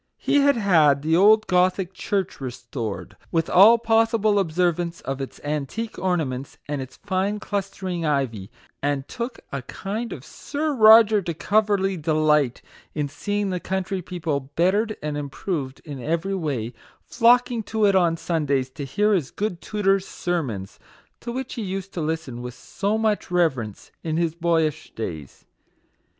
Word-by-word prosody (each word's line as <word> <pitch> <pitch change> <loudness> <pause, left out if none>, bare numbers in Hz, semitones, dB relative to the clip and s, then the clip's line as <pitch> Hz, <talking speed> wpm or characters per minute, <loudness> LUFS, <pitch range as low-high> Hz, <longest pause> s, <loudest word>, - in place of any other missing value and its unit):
He - - +1
had 280 0 +4
had 155 -9 +4
the 160 +1 +2
old 215 +4 +6
Gothic 185 0 +1
church 190 -4 -2
restored, 120 -4 -5 0.2
with 165 -1 0
all 210 +6 +8
possible 225 -2 +2
observance 175 -1 0
of 135 +1 -4
its 135 - -7
antique 150 - -3
orna 180 -3 +1
ments 130 +1 -6
and 145 -2 -2
its 130 0 -9
fine 200 +2 -1
clustering 190 -4 -3
ivy; 130 -10 -1 0.3
and 140 -1 -1
took 240 +1 -5
a 140 - -3
kind 210 - -5
of - - -8
Sir 300 +1 -3
Roger 220 -3 +7
de 170 -3 -4
Coverley 200 0 +1
delight 150 -4 +2 0.3
in 150 -2 -1
seeing 205 +7 -2
the 180 - -2
country 190 +1 -2
people, 155 -6 -3
bettered 205 +6 +2
and 150 -1 -2
improved 140 -1 -4
in 140 -4 -7
every 170 +8 -1
way, 135 - -2 0.3
flocking 240 0 +3
to 215 0 0
it 200 -1 +4
on 170 -3 +3
Sundays 140 -6 -1
to 140 +1 -6
hear 210 +10 +1
his 165 -9 0
good 195 -5 -3
tutor's 195 -2 +1
sermons, 130 - -3 0.4
to 235 - -6
which 260 +1 -4
he 235 - -4
used 195 -1 -5
to 170 - -3
listen 155 -6 -3
with 125 0 -7
so 200 +10 -2
much 220 -2 0
reverence 135 - -1
in 160 -1 -2
his 165 -2 +1
boyish 165 -2 0
days. 80 -10 -6
175 Hz, 155 wpm, -24 LUFS, 145-205 Hz, 0.4 s, all